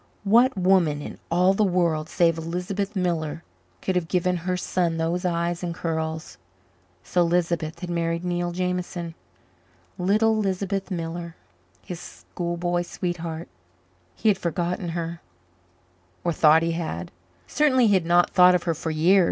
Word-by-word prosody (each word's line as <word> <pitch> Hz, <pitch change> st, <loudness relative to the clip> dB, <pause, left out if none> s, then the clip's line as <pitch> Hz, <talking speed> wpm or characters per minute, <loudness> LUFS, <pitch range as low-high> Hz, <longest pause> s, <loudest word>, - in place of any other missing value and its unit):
What 235 Hz, +4 st, +4 dB
woman 180 Hz, -5 st, +3 dB
in 145 Hz, -, -8 dB
all 180 Hz, +3 st, +4 dB
the 215 Hz, -, +2 dB
world 170 Hz, -5 st, +1 dB
save 165 Hz, -3 st, +2 dB
Lisbeth 185 Hz, +5 st, -3 dB
Miller 165 Hz, -3 st, -1 dB, 0.4 s
could 190 Hz, -, 0 dB
have 175 Hz, -2 st, 0 dB
given 180 Hz, 0 st, +1 dB
her 180 Hz, +2 st, -2 dB
son 175 Hz, -2 st, 0 dB
those 170 Hz, +3 st, -1 dB
eyes 170 Hz, 0 st, -1 dB
and 170 Hz, -2 st, -3 dB
curls? 160 Hz, -2 st, -3 dB, 0.6 s
So 180 Hz, -, +1 dB
Lisbeth 170 Hz, -2 st, 0 dB
had 180 Hz, -, -5 dB
married 170 Hz, 0 st, -1 dB
Neil 175 Hz, 0 st, -1 dB
Jameson 180 Hz, -1 st, -3 dB, 0.9 s
little 215 Hz, +5 st, +3 dB
Lisbeth 195 Hz, -1 st, -1 dB
Miller, 170 Hz, -1 st, -4 dB, 0.5 s
his 175 Hz, -2 st, -7 dB
schoolboy 175 Hz, 0 st, -3 dB
sweetheart. 170 Hz, -2 st, -4 dB, 0.7 s
He 220 Hz, -, +2 dB
had 205 Hz, -, +2 dB
forgotten 175 Hz, +1 st, -2 dB
her 170 Hz, 0 st, -4 dB, 1.0 s
or 170 Hz, -, 0 dB
thought 155 Hz, +1 st, +5 dB
he 170 Hz, -, 0 dB
had; 155 Hz, -, -4 dB, 0.3 s
certainly 260 Hz, -5 st, +3 dB
he 210 Hz, -, +4 dB
had 185 Hz, -3 st, +3 dB
not 175 Hz, 0 st, +4 dB
thought 180 Hz, 0 st, +7 dB
of 175 Hz, -, 0 dB
her 170 Hz, -, 0 dB
for 160 Hz, +1 st, -4 dB
years. 165 Hz, +5 st, +4 dB
175 Hz, 145 wpm, -25 LUFS, 165-185 Hz, 1.0 s, thought